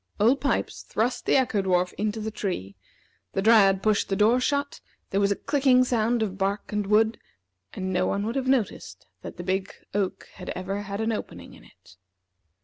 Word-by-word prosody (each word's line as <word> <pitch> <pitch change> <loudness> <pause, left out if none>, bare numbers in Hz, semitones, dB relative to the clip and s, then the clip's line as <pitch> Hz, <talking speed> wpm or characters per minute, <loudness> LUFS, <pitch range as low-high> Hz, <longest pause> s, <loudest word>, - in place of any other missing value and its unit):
Old 240 +7 +3
Pipes 280 - -1
thrust 235 +4 -2
the - - +4
Echo 245 -6 +2
dwarf 180 -1 +1
into 215 +1 -2
the 220 0 -4
tree; 100 - -4 0.6
the 195 - 0
Dryad 200 -4 +5
pushed 215 -2 +1
the 195 - +1
door 220 +5 +4
shut; 285 +2 -1 0.3
there 195 - +1
was 200 0 +2
a - - +2
clicking 265 -2 +3
sound 235 -1 +1
of 195 -2 -4
bark 200 +2 -2
and 210 -1 -1
wood, 220 +2 +3 0.5
and 185 0 -3
no - - +1
one 200 +1 -1
would 230 - -3
have 265 -1 -1
noticed 260 -5 -1 0.2
that - - -9
the 175 - -6
big 190 +1 -1 0.2
oak 200 -2 -2
had 180 - -9
ever 195 +2 -3
had 200 +1 -5
an 220 +1 0
opening 220 - -6
in - - -16
it. 95 - -21
210 Hz, 195 wpm, -26 LUFS, 195-230 Hz, 0.6 s, Dryad